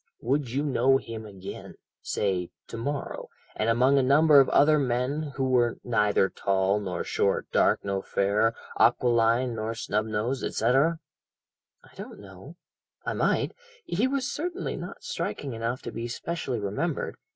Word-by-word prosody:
"Would 135 +1 0
you 135 +5 -1
know 135 -2 +3
him 110 -4 -7
again 95 -2 -9 0.3
say 95 -4 -1 0.2
to - - -7
morrow, 140 +5 -4 0.3
and 110 - 0
among 130 +4 +4
a - - +4
number 145 +3 +6
of 135 - +4
other 150 +1 +5
men 140 +3 -1
who 135 -1 0
were 120 -2 +2
'neither 105 -4 +2
tall 95 +1 0
nor 95 -4 -3
short, - - 0
dark - - +2
nor 100 -1 -1
fair, 105 +4 +1 0.2
aquiline 120 +1 +3
nor 110 0 -3
snub 105 -1 -1
nosed,' 115 +5 -2
etc.?" 135 +9 +2 0.9
"I - - -20
don't - - -9
know 100 - -12 0.5
I - - -1
might - - +1 0.3
he 205 +9 +1
was 270 -1 -1
certainly 350 +5 -3
not - - -8
striking 135 -3 -4
enough 115 +3 -3
to - - -5
be 115 +1 -4
specially 130 0 -3
remembered." 100 0 -2
120 Hz, 150 wpm, -27 LUFS, 105-140 Hz, 0.9 s, number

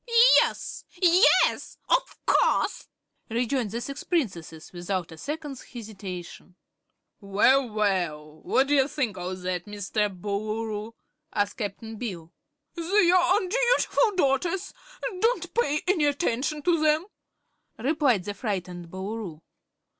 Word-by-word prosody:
"Yes, - - -2 0.2
yes; 360 +3 +4
of - - +1
course!" - - +2 0.4
rejoined 240 0 0
the 230 +4 -4
six 275 +3 -6
Princesses, 175 - -3
without 175 0 -3
a 160 - -10
second's 295 - -5
hesitation. 190 -6 -9 0.6
"Well, 230 +6 +3
well! 175 -8 -1
What 265 - +2
d' 280 - -5
ye 275 -2 +4
think 265 -9 -2
o' 180 +1 -4
that, 180 -1 -3
Mr. 210 +1 -1
Boolooroo?" 215 +3 -4 0.4
asked 205 -1 -1
Cap'n 220 +1 -5
Bill. 180 -8 -6 0.4
"They're 360 +1 +3 0.2
undutiful 475 +1 +2
daughters; 340 +4 0 0.5
don't 465 +5 0
pay 300 -11 +1
any 360 -5 +2
attention 290 0 0
to 335 -1 +2
them," 310 +2 +3 0.7
replied 260 - +2
the 205 - -4
frightened 180 -5 -4
Boolooroo. 190 -3 -6
225 Hz, 115 wpm, -26 LUFS, 190-300 Hz, 0.7 s, yes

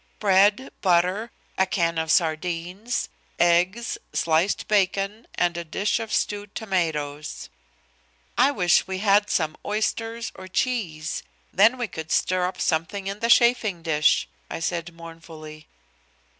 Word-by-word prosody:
Bread, 205 +5 +3
butter, 185 +5 +2 0.3
a 190 - +3
can 170 -3 0
of 160 0 -1
sardines, 175 +7 -1 0.3
eggs, 180 +7 +2
sliced 165 +4 +1
bacon 200 +2 0
and 175 -1 +1
a 170 - -3
dish 195 +8 -1
of 225 -1 -6
stewed 205 0 -2
tomatoes. 155 -7 -3 0.9
"I 270 - +5
wish 180 -12 +2
we 190 0 -3
had 205 +1 +3
some 155 -2 0
oysters 225 +2 -2
or 185 - -10
cheese; 185 -8 -2 0.3
then 220 +6 +5
we 245 -2 -2
could 160 -4 -7
stir 185 -1 +1
up 185 0 -7
something 165 +5 -1
in 200 +1 -4
the 235 +1 -1
chafing 235 -8 +4
dish," 155 -2 +2 0.2
I - - -5
said 170 +1 -3
mournfully. 165 -2 -11
185 Hz, 130 wpm, -24 LUFS, 165-210 Hz, 0.9 s, I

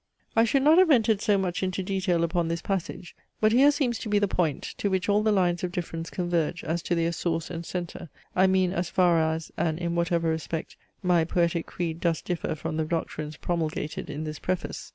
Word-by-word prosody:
I 225 0 +5
should 270 +4 +2
not 310 +4 +6
have 370 -2 +5
entered 225 -7 +4
so 205 -2 +3
much 185 -2 -1
into 190 0 -1
detail 185 -3 0
upon 170 0 0
this 170 +1 -3
passage, 185 -2 -4 0.2
but 215 0 +4
here 265 +5 +6
seems 275 -5 0
to 220 - -5
be 210 - +3
the 205 0 +2
point, 165 -6 0 0.2
to 200 - 0
which 190 0 0
all 205 +1 +3
the 215 0 +2
lines 180 -3 +1
of 180 - -1
difference 165 -2 -4
converge 175 -2 -1
as 170 +2 -1
to 175 - -1
their 165 0 +1
source 165 -1 -2
and 170 -1 -5
centre; 175 -1 -5 0.3
I 185 +1 +5
mean, 185 -1 +2
as 175 -1 -2
far 175 -2 +3
as, 160 0 -2
and 160 -2 0
in 170 0 -2
whatever 170 -1 +1
respect, 160 0 -3 0.3
my 175 -2 +3
poetic 170 0 0
creed 165 -2 -3
does 170 -2 0
differ 175 -3 -2
from 155 0 -4
the 160 - 0
doctrines 155 -2 -3
promulgated 160 -3 -3
in 150 - -4
this 155 -1 -5
preface. 185 -1 -3
175 Hz, 215 wpm, -27 LUFS, 165-190 Hz, 0.3 s, not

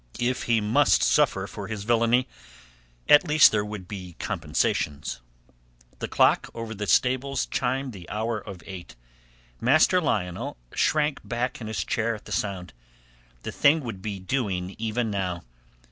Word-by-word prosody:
If 125 +1 -1
he 115 -2 +2
must 120 +7 +3
suffer - - +3
for - - -7
his 110 -2 -5
villainy, 120 +3 +2 0.8
at 150 +4 +6
least 155 0 +7
there 105 -1 +1
would 105 -3 -7
be 90 -4 -8
compensations. 70 -4 -2 0.8
The - - -3
clock - - +3
over 115 -1 -5
the 105 -1 -5
stables 130 +2 +2
chimed 130 0 -2
the 90 -4 -11
hour 110 +1 -2
of 95 -5 -10
eight. 90 -9 -9 0.6
Master 155 +8 +4
Lionel 90 - -2 0.2
shrank 150 -2 +1
back 120 +1 -3
in 110 - -5
his 110 -1 -2
chair 115 0 -1
at 105 - -13
the - - -11
sound. 95 -7 -3 0.7
The - - -4
thing 155 +3 +4
would 115 -8 -6
be 100 0 -4
doing 95 -4 -2
even 115 0 -1
now. 90 -3 -2
110 Hz, 150 wpm, -26 LUFS, 100-125 Hz, 0.8 s, least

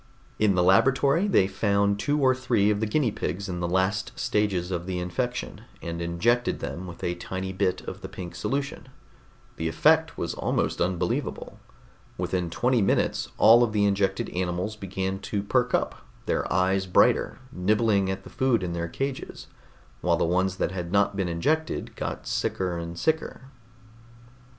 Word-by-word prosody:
In 105 -3 +3
the 90 - +3
laboratory 135 - +4
they 185 - +4
found 100 +1 +1
two 145 +6 +1
or 130 -2 +4
three 120 -5 +2
of 105 - 0
the 110 - 0
guinea 120 +1 +1
pigs 100 0 -3
in 90 -2 -4
the 85 - -1
last 95 +4 0
stages 95 -4 0
of 90 0 -3
the 95 -1 -2
infection, 120 +8 -3 0.2
and 85 0 -5
injected 115 +9 +1
them 70 +7 -5
with 85 - -10
a 85 - 0
tiny 95 +2 -5
bit 95 -1 0
of - - -8
the - - -7
pink 90 -2 -7
solution. 140 -1 -3 0.7
The 80 - -2
effect 160 - +3
was 85 - -2
almost - - -1
unbelievable. 90 0 -2 0.6
Within 90 -2 -1
twenty 120 +7 +1
minutes 95 - +1
all 115 +2 +7
of 115 -3 +2
the 105 -1 +3
injected 100 -1 +1
animals 90 +3 -2
began 95 -1 -3
to 100 0 -3
perk 125 +4 +1
up, - - -2 0.2
their - - -1
eyes 95 +1 +2
brighter, 90 - +3
nibbling 100 +1 +2
at 95 - -3
the - - -12
food 130 -5 +1
in 85 -1 -3
their 85 0 -2
cages, 135 +8 -5 0.5
while 85 -1 +2
the - - +1
ones 95 +2 +1
that 95 - -1
had 90 -2 -5
not 100 0 +2
been 95 -2 -1
injected 155 - -1
got - - -4
sicker 90 -2 -1
and 85 0 -6
sicker. 160 - -1
95 Hz, 170 wpm, -26 LUFS, 90-115 Hz, 0.7 s, all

